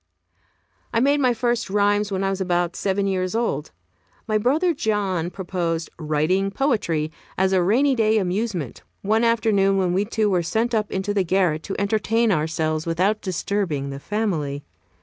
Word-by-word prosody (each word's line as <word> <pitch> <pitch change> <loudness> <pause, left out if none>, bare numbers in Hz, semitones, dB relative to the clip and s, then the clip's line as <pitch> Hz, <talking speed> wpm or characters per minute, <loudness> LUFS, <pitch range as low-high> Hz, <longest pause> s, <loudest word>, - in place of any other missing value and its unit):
I - - +4
made 285 +4 +3
my 255 -3 +3
first 240 -2 -1
rhymes 205 +1 +2
when 195 0 -1
I 195 - +1
was 195 0 -3
about 175 -1 0
seven 195 0 0
years 185 0 -1
old. 235 +1 -1 0.6
My 215 -1 +1
brother 310 - +2
John 200 - -1
proposed 175 -3 -3
"writing 155 +5 +1
poetry" 195 - 0 0.3
as 190 0 +2
a 185 - +4
rainy 250 +10 +3
day 220 -3 +2
amusement, 185 - -2 0.2
one 220 +3 +2
afternoon 220 -4 +2
when 185 -2 +1
we 195 +3 +1
two 220 0 0
were 185 -3 +2
sent 225 +7 -1
up 215 -2 0
into 195 +2 -2
the 200 -2 +2
garret 175 -3 +1
to 195 - -4
entertain 220 +2 +1
ourselves 155 -1 -1
without 185 +6 +1
disturbing 180 -6 -2
the 135 - -6
family. 155 -8 -2
195 Hz, 165 wpm, -23 LUFS, 175-220 Hz, 0.6 s, I